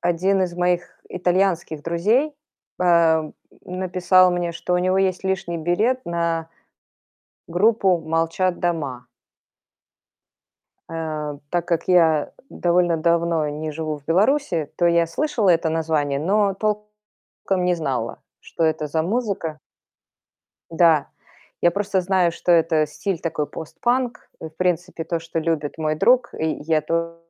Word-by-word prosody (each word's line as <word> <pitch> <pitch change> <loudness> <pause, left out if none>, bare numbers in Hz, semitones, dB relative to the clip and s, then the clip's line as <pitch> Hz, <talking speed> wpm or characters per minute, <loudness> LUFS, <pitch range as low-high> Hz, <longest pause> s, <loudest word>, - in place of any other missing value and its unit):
1 185 +3 +1
из 175 -2 -2
моих 180 0 +1 0.3
итальянских 180 -4 0
друзей, 215 - +1 0.5
э, 165 -3 +3 0.3
написал 185 0 +3
мне, 175 -1 -2
что 175 +1 -2
у 180 - +3
него 185 +1 +1
есть 190 -1 0
лишний 190 -3 -2
билет 215 +11 0
на 170 -1 -1 1.0
группу 190 0 +3
"Молчат 165 +3 -1
дома". 140 -8 -2 1.8
Э, 155 -2 -4
так 175 -1 -1
как 170 -2 0
я 160 -5 +3 0.2
довольно 175 -1 +1
давно 170 -1 +1
не 155 +1 -4
живу 155 -1 -4
в 145 - -23
Беларуси, 185 - +1
то 175 - +2
я 170 0 +3
слышала 215 - 0
это 165 -1 +2
название, 155 -3 0
но 195 +5 +1
толком 210 -2 -4
не 180 0 +2
знала, 135 -8 -3 0.2
что 165 - -3
это 155 -1 0
за 160 +2 -1
музыка. 195 -6 -2 1.1
Да, 165 -3 +3 0.5
я 175 - +5
просто 200 +1 0
знаю, 180 -1 +2
что 175 - 0
это 160 -2 +3
стиль 180 +3 -4
такой- 160 -2 -2
пост-панк. 240 - -3
И - - -6
в 160 - -25
принципе, 180 -1 -1
то, 170 0 -2
что 165 0 -5
любит 160 -2 -2
мой 155 -1 0
друг, 240 +9 +3
и 160 - 0 0.2
я 155 0 +1
тоже 165 +2 -2
170 Hz, 135 wpm, -22 LUFS, 160-185 Hz, 1.8 s, я